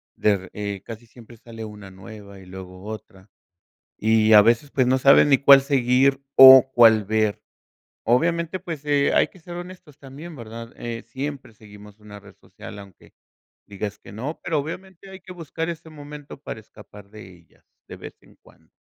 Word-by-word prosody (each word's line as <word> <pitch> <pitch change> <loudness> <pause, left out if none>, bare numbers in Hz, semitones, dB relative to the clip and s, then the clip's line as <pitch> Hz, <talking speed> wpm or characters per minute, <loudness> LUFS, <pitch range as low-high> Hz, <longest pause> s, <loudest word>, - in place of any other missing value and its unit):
de, 100 -3 -1
eh, 100 -2 -6
casi 115 +1 -10
siempre 120 0 -17
sale 115 0 -11
una 105 -2 -12
nueva 100 +1 -13
y 95 - -15
luego 90 0 -12
otra. 105 -2 -11 0.7
Y 110 0 +2
a 105 - +9
veces, 115 +6 +1
pues, 130 -2 +1
no 130 +1 +2
saben 140 +2 +5
ni 135 - +5
cuál 140 0 +7
seguir 135 0 +1
o 130 0 +9
cuál 110 -3 +5
ver. 110 0 -1 0.6
Obviamente, 170 +8 0
pues, 165 -5 -8
eh, 145 -1 +1
hay - - +3
que 185 - -21
ser 175 +1 -11
honestos 175 -5 -11
también, 145 +5 -11
¿verdad?, 115 -1 -10
eh, 115 0 -7
siempre 140 -3 -7
seguimos 105 -1 -16
una 105 -1 -13
red 100 0 -17
social 105 - -12
aunque 100 -3 -17 0.5
digas 105 0 -7
que - - -15
no, 135 +9 -6
pero 160 - -2
obviamente, 185 +5 -8
hay 190 - -11
que 185 0 -14
buscar 165 -1 -6
ese 165 -1 -9
momento 145 -2 -12
para 110 - -8
escapar 105 -2 -17
de 105 -4 -13
ellas 85 -1 -26 0.2
de - - -11
vez - - -11
en - - -23
cuando. - - -24
115 Hz, 180 wpm, -22 LUFS, 105-145 Hz, 0.7 s, a